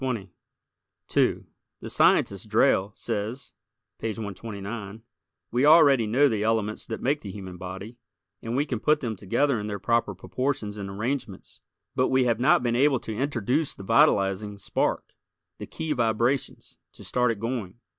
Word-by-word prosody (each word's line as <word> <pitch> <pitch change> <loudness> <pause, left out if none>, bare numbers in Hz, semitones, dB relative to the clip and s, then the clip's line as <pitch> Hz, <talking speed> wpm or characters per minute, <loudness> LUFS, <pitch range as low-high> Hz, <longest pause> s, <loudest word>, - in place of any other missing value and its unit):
2 - - +1 0.3
The - - -8
scientist, - - +2
Drayle, 95 +2 +3
says, 115 +4 -4 0.5
(page 115 -1 -3
129) 105 0 -6 0.5
"We 125 +3 +1
already 145 -6 +6
know 130 +7 +4
the 110 -6 -1
elements 110 -1 -1
that 110 - -5
make 145 +3 +1
the 100 - -7
human 95 -2 -8
body, 95 +6 -8 0.4
and 115 +1 -4
we 140 +3 +1
can 125 -6 -3
put 150 +5 +2
them 115 -4 -3
together 120 +7 0
in 105 - -4
the 105 - -4
their - - -3
proper 115 -2 0
proportions 120 +1 -3
and 100 -1 -5
arrangements; 110 0 -5 0.3
but 130 - +2
we 130 0 +3
have 120 -2 +1
not 125 0 +4
been 120 -1 +1
able 135 +1 +3
to 110 - -6
introduce 135 +4 -1
the 100 - -10
vitalizing 105 -4 +2
spark, 100 - -2 0.5
the - - -7
key 160 -1 -5
vibrations, 120 0 -1
to - - -13
start 125 -1 +1
it 115 -3 -2
going." 115 -5 -4
115 Hz, 160 wpm, -26 LUFS, 105-130 Hz, 0.5 s, already